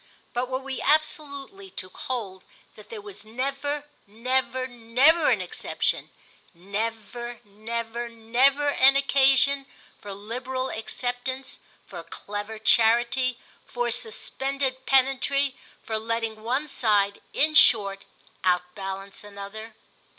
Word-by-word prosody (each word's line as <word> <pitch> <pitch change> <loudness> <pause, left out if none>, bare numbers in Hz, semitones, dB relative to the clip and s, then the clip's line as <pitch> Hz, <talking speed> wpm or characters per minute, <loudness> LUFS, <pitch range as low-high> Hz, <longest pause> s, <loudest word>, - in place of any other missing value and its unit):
But 245 +1 -1
were 260 - 0
we 270 0 -5
absolutely 310 +5 0
to 185 - -3
hold 195 -4 -5 0.3
that 210 - -15
there 215 -3 -8
was 205 0 -8
never, 275 +6 -3 0.2
never, 255 +4 0
never 255 +7 +3
an - - +3
exception, - - -2 0.5
never, 225 +5 -4
never, 230 +3 -4
never 250 +6 +2
an 275 -1 +6
occasion 275 0 +4 0.3
for 205 - -8
liberal 255 +5 -4
acceptance, 245 +3 -4 0.3
for 175 -3 -8
clever 205 +5 -6
charity, 235 +3 +3 0.3
for 240 -1 -1
suspended 260 +3 -1
pedantry—for 270 -3 +1
letting 225 -1 -2
one 260 +7 -1
side, 205 -7 +1
in 310 +1 +3
short, 200 -9 +5 0.4
outbalance 190 +2 -2
another? 205 +2 -9
240 Hz, 105 wpm, -26 LUFS, 215-270 Hz, 0.5 s, an